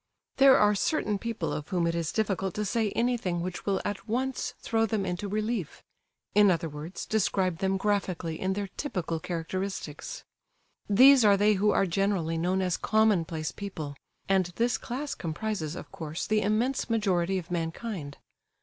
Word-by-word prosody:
There 270 -1 +7
are 210 0 +4
certain 210 -2 0
people 225 -7 -3
of 150 - -4
whom 180 -3 +1
it 170 - +1
is 165 -2 -1
difficult 195 -4 -1
to 210 - -1
say 220 +1 +1
anything 230 -8 0
which 180 +2 -5
will 195 -1 +2
at 205 +2 -4
once 260 +3 -1
throw 225 0 +1
them 205 -2 -1
into 180 +3 -3
relief—in 210 0 -1
other 165 -2 +1
words, 155 +4 -7
describe 190 -5 0
them 190 0 +1
graphically 190 -5 -1
in 190 0 0
their 200 +1 -2
typical 180 - -2
characteristics. 185 - -4 0.7
These 260 +5 +7
are 205 -2 +6
they 210 +1 +4
who 205 +1 +2
are 195 - +3
generally 180 -3 0
known 185 +3 +1
as 180 -2 0
"commonplace 175 -8 +1
people," 160 -8 -6 0.3
and 190 -2 +3
this 240 +1 +1
class 275 +4 -4
comprises, 170 -1 -3
of - - -9
course, 160 0 -5
the 215 0 +2
immense 225 +7 0
majority 190 -5 +1
of 180 -1 -6
mankind. 165 -2 -4
195 Hz, 160 wpm, -28 LUFS, 170-215 Hz, 0.7 s, There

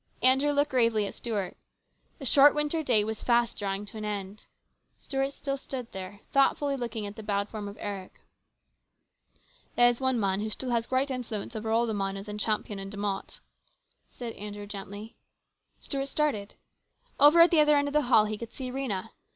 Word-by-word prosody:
Andrew 265 +3 +5
looked 290 0 +1
gravely 230 -4 +3
at - - -5
Stuart. 210 -6 -3 0.6
The 275 - -8
short 280 +4 +7
winter 300 +2 0
day 240 -8 +3
was 220 0 -4
fast 235 -1 +2
drawing 195 0 -2
to 205 - -11
an - - -6
end. 205 -1 -5 0.5
Stuart 270 -1 -2
still 275 0 -4
stood 255 -3 -6
there, 190 +1 -8
thoughtfully 275 +1 +2
looking 235 -4 -4
at 200 0 -7
the 220 - -8
bowed 205 -1 -1
form 210 -2 -6
of 200 - -9
Eric. 195 -2 -6 0.8
" - - -37
There 240 - +6
is 245 +1 +1
one 260 -2 +1
man 195 -2 +1
who 215 +1 -2
still 250 +4 -3
has 235 -1 0
great 265 +2 +1
influence 235 -3 -4
over 220 0 -3
all 230 +2 +3
the 225 - -2
miners 195 0 -3
in 210 0 -5
Champion 210 -1 -1
and 195 0 -6
De 205 - -8
Mott," 200 -1 -4 0.7
said 235 -2 -7
Andrew 205 0 -7
gently. 205 +2 -8 0.6
Stuart 275 -1 -3
started. 270 -9 -1 0.6
Over 295 +4 +7
at 340 - +7
the 330 - +5
other 300 0 +5
end 285 0 +2
of 285 - -4
the 300 - +4
hall 220 -4 +6
he 215 0 -4
could 235 -1 -7
see 255 -2 -6
Rhena. 250 -8 -3
225 Hz, 195 wpm, -28 LUFS, 205-270 Hz, 0.8 s, short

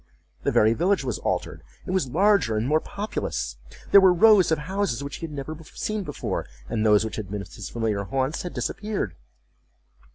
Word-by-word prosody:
The - - 0
very 110 +1 +4
village 180 +5 +1
was 125 -7 -3
altered; - - -2 0.2
it - - -4
was 185 -9 0
larger 180 - +3
and 110 +3 0
more 155 +2 +3
populous. 205 +6 -4 0.3
There 200 - +9
were 190 -1 +7
rows 190 -1 +6
of 160 - +3
houses 185 - -2
which 140 - -6
he 165 - -5
had - - -12
never 145 +2 -5 0.2
seen 215 0 -2
before, 150 -7 -4 0.2
and 110 - -1
those 105 0 +4
which 110 - -5
had 105 -4 -5
been 105 0 -3
his 90 -3 -8
familiar 110 -4 -1
haunts 130 - -1
had 180 - -6
disappeared. 205 - -3
150 Hz, 190 wpm, -25 LUFS, -, 0.3 s, There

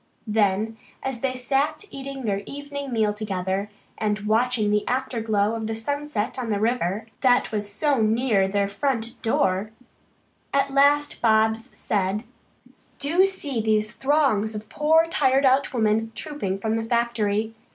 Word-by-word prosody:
Then, 215 0 +1 0.2
as 265 -3 -3
they 260 -1 -1
sat 280 +7 0
eating 275 -1 -6
their 200 -2 0
evening 285 -1 -6
meal 215 -3 +1
together 195 -1 -2 0.3
and 210 -1 0
watching 220 0 +1
the 210 0 +2
afterglow 225 -5 0
of 225 -1 -3
the 225 - -2
sunset 285 -1 -2
on 240 -3 -3
the 205 -2 0
river, 220 -2 0
that 250 -2 +3
was 205 -1 -3
so 275 +4 +1
near 220 -2 +2
their 200 0 0
front 230 +2 -2
door, 195 -2 +1 0.9
at 275 0 +2
last 285 +1 +3
Bobs 220 +1 +2
said: 200 +1 -1 0.7
"Do 340 +7 +3
see 290 -11 -3
those 215 -1 +1
throngs 265 -7 +1
of 210 0 -7
poor 320 +2 +3
tired 275 -4 +2
out 265 +1 +3
women 225 -2 +1
trooping 290 -12 -3
from 220 +2 -1
the 225 - -2
factory. 225 -2 0
225 Hz, 145 wpm, -24 LUFS, 210-270 Hz, 0.9 s, that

